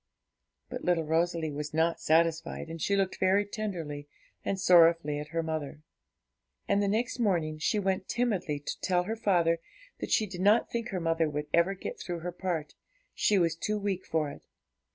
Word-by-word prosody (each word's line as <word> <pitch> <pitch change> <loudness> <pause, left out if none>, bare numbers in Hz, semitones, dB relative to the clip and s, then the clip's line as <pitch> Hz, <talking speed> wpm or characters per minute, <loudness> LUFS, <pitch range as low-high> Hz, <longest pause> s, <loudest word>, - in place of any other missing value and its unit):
But 250 0 -6
little 175 -2 +2
Rosalie 165 0 0
was 150 +1 -5
not 165 +1 +1
satisfied, 165 0 +1
she 200 - +1
looked 195 -1 0
very 195 +2 +3
tenderly 170 -9 -5 0.4
and 195 - -2
sorrowfully 165 -5 +5
at 150 - -6
her 165 +1 -2
mother; 155 -2 -4 0.8
and 200 - +2
the 200 - +1
next 230 +5 -1
morning 165 -8 0
she 185 - +1
went 190 -1 -1
timidly 205 -11 0
to - - -5
tell 180 -1 +2
her 220 +5 -3
father 175 -7 +2 0.4
that - - -4
she 220 - +3
did 185 -3 -7
not 210 +4 +4
think 235 0 -3
her 185 - -2
mother 165 -1 +1
would 150 0 -3
ever 170 +4 +3
get - - -6
through 175 -2 -5
her 175 +2 -4
part, 175 -4 -3 0.4
she 210 - +2
was 165 -3 +2
too 210 +5 -2
weak 200 -2 -2
for 155 -3 -1
it. - - -11
175 Hz, 180 wpm, -29 LUFS, 160-195 Hz, 0.8 s, sorrowfully